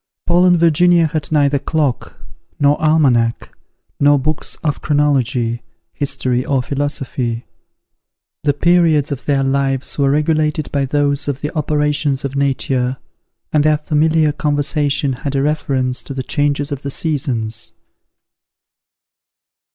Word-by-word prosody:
Paul 175 Hz, +1 st, +3 dB
and 175 Hz, -1 st, +5 dB
Virginia 170 Hz, +1 st, +4 dB
had 155 Hz, -1 st, -3 dB
neither 145 Hz, -2 st, +2 dB
clock, 150 Hz, -4 st, -2 dB, 0.4 s
nor 145 Hz, 0 st, +4 dB
almanack, 135 Hz, -7 st, +2 dB, 0.5 s
nor 145 Hz, 0 st, +5 dB
books 155 Hz, +3 st, -3 dB
of 150 Hz, -3 st, -1 dB
chronology, 135 Hz, -5 st, +1 dB, 0.3 s
history 130 Hz, -3 st, -1 dB
or 135 Hz, -2 st, 0 dB
philosophy. 130 Hz, -4 st, -3 dB, 1.0 s
The 145 Hz, -2 st, +1 dB
periods 165 Hz, -3 st, +3 dB
of 135 Hz, -2 st, -5 dB
their 140 Hz, -2 st, +1 dB
lives 135 Hz, 0 st, -1 dB
were 140 Hz, -1 st, +3 dB
regulated 150 Hz, 0 st, 0 dB
by 140 Hz, -1 st, 0 dB
those 145 Hz, +1 st, 0 dB
of 140 Hz, -1 st, -3 dB
the 150 Hz, -, -4 dB
operations 150 Hz, -2 st, 0 dB
of 140 Hz, 0 st, -4 dB
nature, 135 Hz, -2 st, 0 dB, 0.6 s
and 150 Hz, -1 st, +3 dB
their 155 Hz, 0 st, +3 dB
familiar 155 Hz, +1 st, +2 dB
conversation 145 Hz, -1 st, 0 dB
had 135 Hz, +2 st, -5 dB
a 135 Hz, -, +1 dB
reference 135 Hz, -4 st, -1 dB
to 140 Hz, -, -8 dB
the 130 Hz, -, -3 dB
changes 145 Hz, +2 st, -1 dB
of 140 Hz, -1 st, -4 dB
the 140 Hz, -, -4 dB
seasons. 115 Hz, -, -2 dB
145 Hz, 130 wpm, -17 LUFS, 135-150 Hz, 1.0 s, and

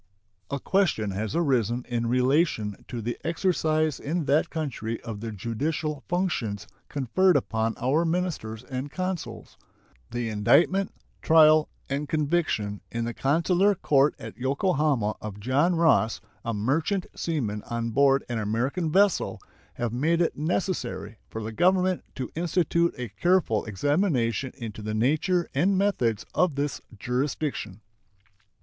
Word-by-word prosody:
A 140 Hz, -, -2 dB
question 150 Hz, -, +1 dB
has 105 Hz, +8 st, -3 dB
arisen 125 Hz, -7 st, +1 dB
in 120 Hz, -1 st, -1 dB
relation 125 Hz, -, +1 dB
to 120 Hz, -3 st, -5 dB
the 120 Hz, +2 st, -3 dB
exercise 155 Hz, -4 st, +1 dB
in 160 Hz, +2 st, -2 dB
that 150 Hz, +4 st, +2 dB
country 125 Hz, -8 st, -3 dB
of 115 Hz, -3 st, -6 dB
the 115 Hz, +1 st, -5 dB
judicial 135 Hz, -, -3 dB
functions 125 Hz, -, -1 dB, 0.2 s
conferred 145 Hz, +6 st, +3 dB
upon 115 Hz, -3 st, -1 dB
our 140 Hz, +7 st, +2 dB
ministers 160 Hz, -10 st, -2 dB
and 130 Hz, +2 st, -5 dB
consuls. 185 Hz, +2 st, -5 dB, 0.5 s
The 120 Hz, 0 st, -3 dB
indictment, 150 Hz, -, +3 dB, 0.3 s
trial, 155 Hz, -1 st, +6 dB, 0.2 s
and 140 Hz, +2 st, -3 dB
conviction 150 Hz, -, 0 dB
in 115 Hz, 0 st, -2 dB
the 120 Hz, -, -3 dB
consular 175 Hz, -, +2 dB
court 145 Hz, -4 st, +3 dB
at -, -, -9 dB
Yokohama 135 Hz, -, +1 dB
of 105 Hz, -1 st, -7 dB
John 140 Hz, -, +2 dB
Ross, 160 Hz, -9 st, +3 dB, 0.2 s
a 115 Hz, -, -2 dB
merchant 150 Hz, -, 0 dB
seaman 115 Hz, -11 st, -2 dB
on 115 Hz, -1 st, -2 dB
board 135 Hz, +2 st, +4 dB
an 120 Hz, -2 st, -2 dB
American 125 Hz, -, -1 dB
vessel, 195 Hz, +1 st, +2 dB, 0.4 s
have 120 Hz, -2 st, -2 dB
made 160 Hz, +7 st, +1 dB
it 170 Hz, -, +1 dB
necessary 150 Hz, -, -2 dB
for 110 Hz, -, -5 dB
the 110 Hz, -, -4 dB
Government 185 Hz, -, +2 dB
to 130 Hz, -2 st, -5 dB
institute 170 Hz, 0 st, +1 dB
a 125 Hz, -2 st, -4 dB
careful 165 Hz, -, +1 dB
examination 130 Hz, -, 0 dB
into 110 Hz, -4 st, -7 dB
the 110 Hz, 0 st, -3 dB
nature 155 Hz, -, +1 dB
and 190 Hz, +2 st, +2 dB
methods 125 Hz, -, +1 dB
of 180 Hz, -6 st, +2 dB
this 140 Hz, 0 st, -2 dB, 0.2 s
jurisdiction. 125 Hz, -3 st, -2 dB
140 Hz, 135 wpm, -26 LUFS, 115-170 Hz, 0.5 s, trial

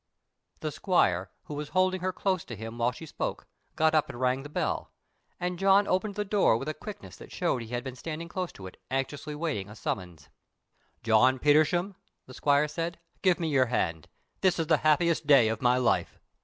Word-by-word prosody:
The 155 Hz, -, -2 dB
squire, 95 Hz, -, +1 dB
who -, -, -8 dB
was 145 Hz, 0 st, -5 dB
holding 185 Hz, 0 st, +2 dB
her 185 Hz, +1 st, 0 dB
close 185 Hz, -1 st, -1 dB
to 120 Hz, -, -7 dB
him 115 Hz, +3 st, -8 dB
while 120 Hz, +1 st, +2 dB
she 145 Hz, +6 st, -10 dB
spoke, -, -, -4 dB, 0.3 s
got 160 Hz, 0 st, +3 dB
up 155 Hz, -2 st, +2 dB
and 120 Hz, -, -8 dB
rang 130 Hz, +1 st, +1 dB
the 145 Hz, -, -9 dB
bell, -, -, -2 dB, 0.5 s
and 180 Hz, 0 st, -3 dB
John 195 Hz, +1 st, +5 dB
opened 195 Hz, +2 st, 0 dB
the 210 Hz, 0 st, -2 dB
door 195 Hz, -, +3 dB
with 135 Hz, -, -6 dB
a 155 Hz, -, -1 dB
quickness 210 Hz, +4 st, -9 dB
that -, -, -13 dB
showed 170 Hz, -9 st, 0 dB
that -, -, -6 dB
he 115 Hz, -, -10 dB
had 120 Hz, -, -3 dB
been 130 Hz, -2 st, -6 dB
standing 165 Hz, +4 st, -6 dB
close 180 Hz, 0 st, -4 dB
to 95 Hz, -, -11 dB
it, 95 Hz, -, -11 dB
anxiously 135 Hz, +3 st, -3 dB
waiting 150 Hz, -, -3 dB
a 105 Hz, -, -10 dB
summons. 90 Hz, -8 st, -5 dB, 0.7 s
"John 115 Hz, +4 st, +4 dB
Petersham," 155 Hz, +7 st, +3 dB, 0.3 s
the 130 Hz, -, -12 dB
squire 145 Hz, +2 st, +2 dB
said, 165 Hz, +2 st, -4 dB, 0.2 s
"give 185 Hz, -2 st, +3 dB
me 165 Hz, -2 st, -1 dB
your 130 Hz, -3 st, +3 dB
hand; 80 Hz, -9 st, -1 dB, 0.3 s
this 185 Hz, -2 st, +2 dB
is 165 Hz, -, 0 dB
the 160 Hz, -, +3 dB
happiest 155 Hz, 0 st, +2 dB
day 135 Hz, -7 st, +6 dB
of 110 Hz, -1 st, -3 dB
my 125 Hz, 0 st, +4 dB
life!" 125 Hz, -, +1 dB
150 Hz, 210 wpm, -28 LUFS, 125-175 Hz, 0.7 s, day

